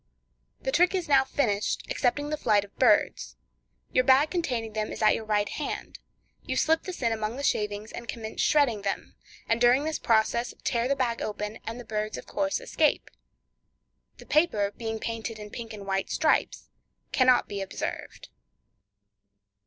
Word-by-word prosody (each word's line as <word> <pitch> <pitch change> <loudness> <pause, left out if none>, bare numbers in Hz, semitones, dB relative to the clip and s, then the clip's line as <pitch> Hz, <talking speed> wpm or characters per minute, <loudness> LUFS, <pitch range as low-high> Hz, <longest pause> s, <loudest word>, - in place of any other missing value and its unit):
The 265 - -2
trick 355 +6 +3
is 365 -2 -2
now 275 -2 +5
finished, 225 -7 0
excepting 290 +4 0
the - - +1
flight 205 -8 +2
of 200 - -22
birds. - - +3 0.6
Your 255 - +3
bag 270 +4 +5
containing 245 -11 -2
them 215 0 -2
is - - -6
at 215 - +6
your 220 - -3
right 210 -1 +1
hand; 300 - -5 0.4
you - - -4
slip 320 +1 +2
this 365 -8 -6
in 230 - +2
among 220 0 -2
the 280 - -5
shavings, 210 -3 -1
and 235 - -8
commence 220 -1 -4
shredding 275 -9 +3
them, 200 0 -3 0.3
and 230 +1 +1
during 245 +3 +5
this 315 0 -2
process 230 +2 +1
tear 235 -1 0
the 280 - +1
bag 245 -3 -1
open, 210 +1 -4
and 230 +2 -4
the 245 - -9
birds, 215 0 -3
of - - -9
course, 290 +8 -1
escape. - - 0 1.1
The - - -13
paper 215 -11 +2
being 225 -1 -4
painted 225 -1 -4
in 210 -1 -9
pink 230 -2 -7
and 205 -2 -8
white 195 0 -1
stripes, 310 0 +1 0.4
cannot 255 -1 +4
be 200 -1 -4
observed. 195 - -6
235 Hz, 170 wpm, -27 LUFS, 215-280 Hz, 1.1 s, at